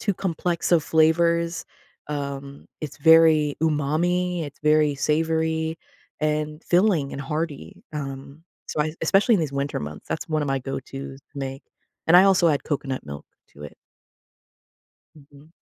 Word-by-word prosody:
too 205 - 0
complex 175 -1 -2
of 165 -3 +5
flavors, 170 +1 +2 0.4
um, 140 -1 -5
it's 150 -3 -6
very 160 -1 +5
umami, 165 +4 0
it's 145 -1 -10
very 150 -1 +3
savory 160 +2 0 0.4
and 150 0 -1
filling 175 -6 +2
and 140 - -5
hearty, 150 - -5
um, 140 +1 -7 0.2
so, 150 - -2
I 155 +1 0
especially 200 +8 +4
in - - 0
these 155 -4 -2
winter 140 +1 -2
months, 75 +1 -8
that's 160 - -4
one 155 -1 0
of 145 - -3
my 135 0 +1
go-tos 135 +1 -7
to 140 - -13
make, 135 0 -5 0.5
and 175 - +8
I 185 - +8
also 190 -3 +4
add 145 -2 0
coconut 135 - -3
milk 70 0 -8 0.3
to 75 - -13
it. 75 - -10 1.4
Mhm. 145 +1 -18
150 Hz, 150 wpm, -24 LUFS, 140-165 Hz, 1.4 s, and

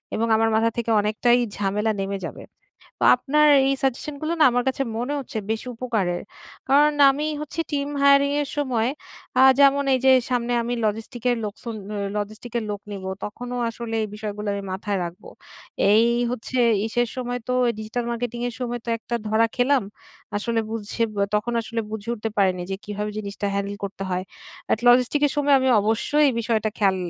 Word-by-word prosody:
এবং 230 +1 0
আমার 225 0 +2
মাথা 225 +1 +3
থেকে 235 -1 -1
অনেকটাই 220 +4 +2 0.2
ঝামেলা 210 +2 0
নেমে 195 0 -3
যাবে। - - -8 0.6
তো - - +2
আপনার 300 +2 +2 0.2
এই 275 - +2
সাজেশনগুলো 285 +4 -2
না - - +8
আমার 245 0 +1
কাছে 265 +1 -1 0.2
মনে 250 +5 -2
হচ্ছে 255 -4 -5
বেশি 220 +2 -2
উপকারের। 220 -8 -1 0.5
কারণ 295 +2 +5 0.2
আমি 295 +3 -2
হচ্ছি 305 +2 -5
টিম 280 0 -1
হায়ারিং 280 0 +5
এর 285 - -5
সময় 250 -6 0 0.5
আ - - +7 0.2
যেমন 280 0 +5
এই 260 - +2
যে 265 - +8 0.2
সামনে 245 -1 0
আমি 240 +1 -2
লজিস্টিক 225 +3 -3
এর 245 - +1
লোকসন 220 +2 -6 0.2
অ - - -3 0.2
লজিস্টিক 215 +3 -5
এর 230 - -3
লোক 205 -1 -4
নিবো। 190 -1 -5
তখনো 245 +4 -6 0.2
আসলে 230 0 -6
এই - - -6
বিষয়গুলো 210 0 -5
আমি 200 - -4
মাথায় 195 +1 -2
রাখবো। 170 +1 -9 0.6
এই 220 +2 +6 0.3
হচ্ছে 250 +1 -4 0.3
ইসের 240 +1 0
সময় 245 -1 -3
তো 250 - +1 0.2
ডিজিটাল 220 +3 -3
মার্কেটিং 235 0 -3
এর 240 - -7
সময় 240 -1 -3
তো - - -7
একটা 235 - -6
ধরা 220 +2 +3
খেলাম। 260 +1 +3 0.5
আসলে 225 +2 0
বুঝঝে 225 +1 -3
বে 200 - 0
তখন 210 +3 0
আসলে 230 0 -3
বুঝে 220 0 -6
উঠতে 225 -1 -4
পারিনি 185 -2 +2
যে 195 - -2
কিভাবে 210 0 -4
জিনিসটা 200 -1 -4
হ্যান্ডেল 200 0 -2
করতে 195 0 -6
হয়? 180 +1 -1 0.5
এট 220 - +1
লজিস্টিকস 250 +4 +4
এর 280 - -2
সময় 290 -1 +3
আমি 260 - +1
অবশ্যই 225 +8 +1
এই - - +1
বিষয়টা 220 -2 0
খেয়াল 195 -3 +3
230 Hz, 185 wpm, -23 LUFS, 210-255 Hz, 0.6 s, না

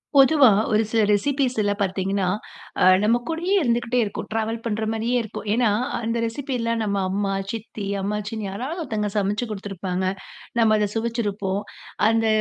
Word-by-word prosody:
பொதுவா 275 -1 +7 0.2
ஒரு 215 +1 +3
சில 225 0 +2
ரெசிப்பீஸ்ல 245 -1 +1
பாத்தீங்கன்னா, 195 0 0 0.6
ஆ - - +5 0.2
நம்ம 225 +3 +4
கூடயே 335 +4 -1
இருந்துக்கிட்டே 240 -2 +1
இருக்கும். 205 - -5
ட்ராவல் 225 +1 -1
பண்ற 220 -1 -1
மாரியே 230 +3 -1
இருக்கும். 220 -1 -7
ஏன்னா 235 0 +3 0.3
அந்த 230 0 -1
ரெசிப்பில்லாம் 230 -2 -2
நம்ம 200 -2 -1
அம்மா, 195 +1 -1 0.2
சித்தி, 220 -2 -6 0.2
அம்மாச்சின்னு 210 +2 -3
யாராவது 255 - -4
ஒருத்தவங்க 215 -6 -2
சமைச்சு 205 +3 0
குடுத்துருப்பாங்க. 190 -2 -3 0.5
நம்ம 220 -1 +5
அத 210 - +1
சுவைச்சிருப்போம். 210 -4 -1 0.5
அந்த 225 0 +2
220 Hz, 140 wpm, -23 LUFS, 205-235 Hz, 0.6 s, பொதுவா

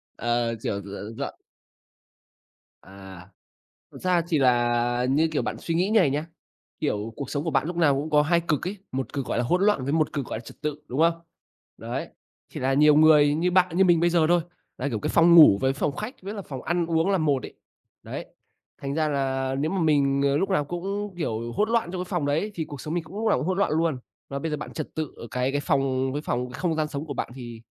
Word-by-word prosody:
Ờ, 120 0 0
kiểu, 100 -2 -2
d - - -14 0.3
dọn - - -4 1.5
À. 95 -1 -12 0.7
Thật - - -10
ra 180 -2 +2
thì 160 - +2
là, 120 -1 +2
như 155 +4 +3
kiểu, - - 0
bạn - - -3
suy 165 - -3
nghĩ 180 +4 +2
như 220 - +5
này 155 -7 +3
nhá, 150 +4 -2 0.5
kiểu, 105 +2 -2
cuộc 140 - -6
sống 145 0 -2
của 165 - -1
bạn 135 -1 +1
lúc 175 0 -4
nào 155 -5 +4
cũng 145 +3 -3
có 150 -1 +5
2 170 +3 +2
cực 165 -2 -1
ấy, 205 - -5 0.2
1 130 0 -3
cực 135 -3 -3
gọi - - -1
là 120 - +1
hỗn 180 +10 +1
loạn, 205 -11 +2
với 140 - -1
1 155 -1 +1
cực 140 -3 -2
gọi - - -4
là - - -8
trật 120 - -14
tự, 150 0 -3
đúng 130 +5 -2
không? 165 +1 +4 0.6
Đấy, - - -4 0.4
thì - - -7
là 135 +1 +1
nhiều 150 +1 +6
người 150 -2 +6
như 175 +3 +1
bạn 180 -1 +2
như 190 - +5
mình 175 -2 +4
bây 175 0 +3
giờ 165 -2 +3
thôi, 175 0 +4 0.4
là, 130 - -1
kiểu, 115 -6 -2
cái - - -2
phòng 170 0 +5
ngủ 150 -12 +9
với 135 0 +2
phòng 140 +1 -2
khách 215 - -6
với 200 +3 -6
là 200 - -5
phòng 135 -7 -7
ăn 175 0 0
uống 165 +3 +1
là 195 - +2
một 145 -5 +1
ấy. - - -9 0.5
Đấy, - - -6 0.6
thành 140 0 -3
ra 155 0 +1
là 135 -2 -1
nếu 150 +3 0
mà 195 - -1
mình, 140 -3 +2
ờ, 140 0 +2
lúc 190 +6 0
nào 170 -6 +2
cũng, 195 +5 -4
kiểu, 115 -8 -3
hỗn 210 - +1
loạn 230 -7 +1
trong 185 - -3
cái - - -16
phòng 175 -7 -1
đấy, 160 +9 0
thì 165 - -3
cuộc 145 -3 -9
sống 155 +5 -4
mình 175 -2 -2
cũng 175 +5 -11
lúc 225 - 0
nào - - +3
cũng - - -3
hỗn 185 0 0
loạn 200 - +2
luôn. 160 -4 +1 0.3
Mà 140 - -4
bây 160 +3 -3
giờ 150 - -1
bạn 150 - -7
trật 155 - -6
tự 155 -3 -3
ở 115 - -9
cái 125 +1 -1
cái 145 - 0
phòng 135 -2 0
cái 145 - -3
phòng 125 -3 -2
cái 125 - -8
không 175 -3 0
gian 155 -1 -1
sống 145 +1 -5
của 140 - -5
bạn - - -3
thì 120 -3 -9
150 Hz, 260 wpm, -25 LUFS, 135-170 Hz, 1.5 s, ngủ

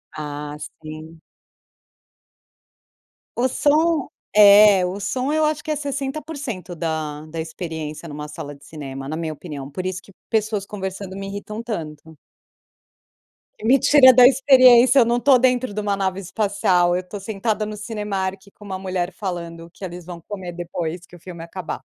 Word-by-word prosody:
Ah, 150 -1 -6 0.2
sim. 155 +1 -10 2.2
O 245 +2 +2
som, 300 +3 +2 0.3
é 205 -2 +8
o 185 +3 -4
som, 255 +7 -2
eu 310 0 +2
acho 305 -1 -1
que 310 - -3
é - - +1
60% 280 - -5
da 155 -2 -3
da 160 +1 -7
experiência 160 -1 -6
numa 150 -1 -7
sala 145 -1 -8
de 140 - -19
cinema, 135 -3 -7
na 155 - -3
minha 160 -1 -3
opinião, 145 -3 -8
por 180 +6 -6
isso 185 0 -3
que 195 - -18 0.2
pessoas 215 -2 0
conversando 190 -1 -6
me 195 0 -5
irritam 205 +2 -6
tanto. 160 -8 -7 1.5
Me 250 +5 +5
tira 265 -1 +7
da 250 0 +8
experiência. 255 -1 +6
Eu 240 - +6
não 235 +1 +1
estou 260 +1 +5
dentro 250 -2 +1
de 210 - -2
uma 205 -1 0
nave 190 -1 -1
espacial. 190 -2 +1
Eu 180 - 0
estou 185 +3 -8
sentada 215 +2 -2
no 210 0 -6
Cinemark, 205 -3 -3 0.2
com - - -14
uma 190 -2 -5
mulher 185 -1 -2
falando 170 -3 -6
que - - -14
eles 175 -2 -7
vão 175 -1 -9
comer 185 -1 -7
depois 175 0 -5
que 175 - -16
o - - -14
filme 170 -1 -9
acabar. 170 +1 -6
190 Hz, 165 wpm, -22 LUFS, 165-230 Hz, 2.2 s, é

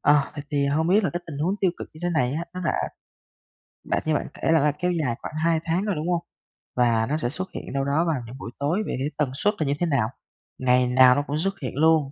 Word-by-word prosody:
ờ, 145 0 +5
vậy 145 - -5
thì 140 -1 +1
hông 155 +4 +1
biết 205 +3 +4
là - - +1
cái 175 - -2
tình 145 -4 -6
huống 170 +6 +1
tiêu 190 - +3
cực - - -7
như 155 - -14
thế 175 - +1
này 135 -7 +1
á, 165 +3 -2
nó 180 - -4
đã 155 - +2 1.1
đã - - 0
như 155 - +2
bạn 145 - 0
kể - - 0
là 165 - +5
là 150 0 +3
kéo 180 +5 -1
dài 150 -9 0
khoảng - - -6
2 165 -1 +3
tháng 175 +4 0
rồi, 205 -3 0
đúng 155 +3 -2
hông? 175 -1 +1 0.5
Và 115 -2 +3
nó 150 - +1
sẽ 135 -6 -1
xuất 185 +7 -5
hiện - - -7
đâu 135 0 0
đó 150 +5 +2
vào 155 -6 0
những 120 +3 -9
buổi 120 - -7
tối 160 +9 +1
vậy - - -2
thì 140 - -1
tần 145 -4 +1
suất 205 +10 +1
là 155 - 0
như 140 - +2
thế 175 - +2
nào? 135 -9 +1 0.5
Ngày 125 0 +3
nào 125 0 +6
nó 145 - +2
cũng 145 +2 -1
xuất 195 +3 -1
hiện 130 - -4
luôn 155 -2 +3
150 Hz, 280 wpm, -25 LUFS, 135-170 Hz, 1.1 s, nào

